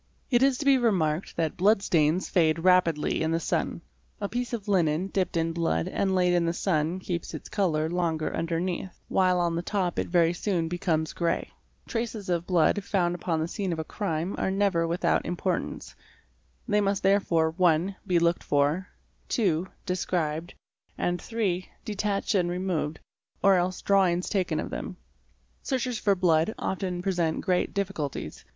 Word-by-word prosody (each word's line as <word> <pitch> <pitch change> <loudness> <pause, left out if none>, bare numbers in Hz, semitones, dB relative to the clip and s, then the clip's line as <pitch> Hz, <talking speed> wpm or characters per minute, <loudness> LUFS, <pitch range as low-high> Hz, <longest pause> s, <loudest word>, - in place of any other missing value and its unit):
It 240 -1 +4
is 270 -1 +4
to 285 - -4
be 275 -2 +5
remarked 180 -8 0
that 160 -2 0
blood 195 +2 +4
stains 165 0 +2
fade 160 -3 +3
rapidly 170 -3 +2
in 160 - +1
the 165 - +1
sun®®, 165 - -2 0.4
A 205 - -2
piece 245 +3 -3
of 220 -4 -4
linen 180 -2 +1
dipped 185 -4 -1
in 165 0 0
blood 165 - 0
and 190 -1 0
laid 180 -1 +3
in 175 -1 +2
the 165 - +1
sun 170 -1 0
keeps 175 -2 -4
its - - -8
colour 160 -6 +1
longer 165 -2 -1
underneath, 170 +2 -2
while 185 -1 +3
on 170 -1 +1
the 170 - -1
top 180 -1 -1
it - - -1
very 170 -1 +3
soon 175 -2 -1
becomes 160 -2 -1
grey 170 -1 -1 0.3
%", - - -33
Traces 225 -4 -3
of 170 -1 0
blood, 180 +3 +3
found 175 -4 +1
upon 170 -2 -2
the 160 - -1
scene 195 0 -3
of 165 - -2
a 160 - -2
crime, 170 -1 -3
are - - 0
never 190 -4 +1
without 170 +2 +1
importance; 175 0 -3 0.7
they 210 -2 +3
must 200 -1 0
therefore 180 -5 +3
(1) 175 +2 +2
be 180 -3 +3
looked 170 0 +2
for, 145 +6 +1 0.4
(2) 185 - +1 0.2
described, 170 -2 -2 0.4
and 175 0 -1
(3) 195 -6 -2 0.2
detacued 205 0 -1
and 175 -1 0
removed, 175 -4 -2 0.4
or 195 - +6
else 180 0 0
drawings 185 -3 +2
taken 190 -4 0
of - - -4
them. - - -5 0.6
Searches 250 -4 -2
for 200 -1 +3
blood 175 +2 +2
often 180 -2 -3
present 175 -4 0
great 180 -1 +1
difficulties. 195 -8 -3
180 Hz, 170 wpm, -27 LUFS, 165-195 Hz, 0.7 s, or